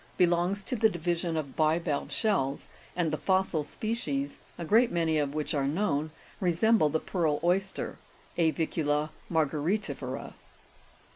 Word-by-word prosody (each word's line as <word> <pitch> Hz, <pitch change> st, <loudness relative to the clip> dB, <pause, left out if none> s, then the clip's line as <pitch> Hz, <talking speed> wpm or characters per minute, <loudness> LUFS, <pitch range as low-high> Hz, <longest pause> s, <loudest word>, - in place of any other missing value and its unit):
63) 180 Hz, -, +6 dB
belongs 175 Hz, +3 st, 0 dB
to 250 Hz, -, -3 dB
the 220 Hz, -1 st, +4 dB
division 170 Hz, -2 st, -1 dB
of 140 Hz, -4 st, -4 dB
bivalve 155 Hz, -1 st, +1 dB
shells, 145 Hz, -, 0 dB, 0.3 s
and 170 Hz, -3 st, +1 dB
the 155 Hz, -, -1 dB
fossil 185 Hz, -2 st, +1 dB
species, 145 Hz, -6 st, -3 dB, 0.2 s
a 170 Hz, -, -4 dB
great 230 Hz, +7 st, +4 dB
many 165 Hz, -2 st, +1 dB
of 145 Hz, 0 st, -1 dB
which 155 Hz, -1 st, -2 dB
are 140 Hz, -2 st, +1 dB
known, 155 Hz, -2 st, 0 dB, 0.3 s
resemble 180 Hz, -1 st, +3 dB
the 160 Hz, +2 st, 0 dB
pearl 160 Hz, -5 st, 0 dB
oyster 190 Hz, +3 st, 0 dB, 0.4 s
(A'vicula 155 Hz, -2 st, +1 dB, 0.2 s
Margaritifera). 150 Hz, -3 st, -1 dB
165 Hz, 135 wpm, -29 LUFS, 150-185 Hz, 0.4 s, 63